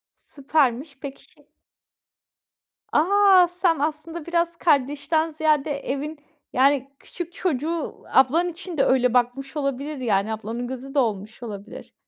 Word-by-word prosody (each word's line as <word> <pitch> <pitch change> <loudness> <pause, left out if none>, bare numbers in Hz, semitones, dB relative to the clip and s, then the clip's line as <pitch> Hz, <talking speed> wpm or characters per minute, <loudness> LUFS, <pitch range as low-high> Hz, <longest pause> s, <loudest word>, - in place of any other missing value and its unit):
Süpermiş. 275 -1 -1
Peki, 275 0 -8
şey. - - -25 1.5
A, 380 +2 +5
sen 355 -2 +1
aslında 310 +2 -3
biraz 340 0 0
kardeşten 295 +1 +1
ziyade 305 -2 +1
evin, 285 +3 -4 0.3
yani, 270 +1 +3
küçük 350 -1 -7
çocuğu, 330 -2 -3
ablan 300 +7 +4
için 350 -1 -7
de - - +5
öyle 250 -2 +3
bakmış 250 +4 0
olabilir, 280 +1 -2
yani, 215 -4 0
ablanın 225 +3 -4
gözü 260 +2 -7
de - - +1
olmuş 215 -2 -1
olabilir. 205 -3 -8
285 Hz, 125 wpm, -24 LUFS, 255-330 Hz, 1.5 s, A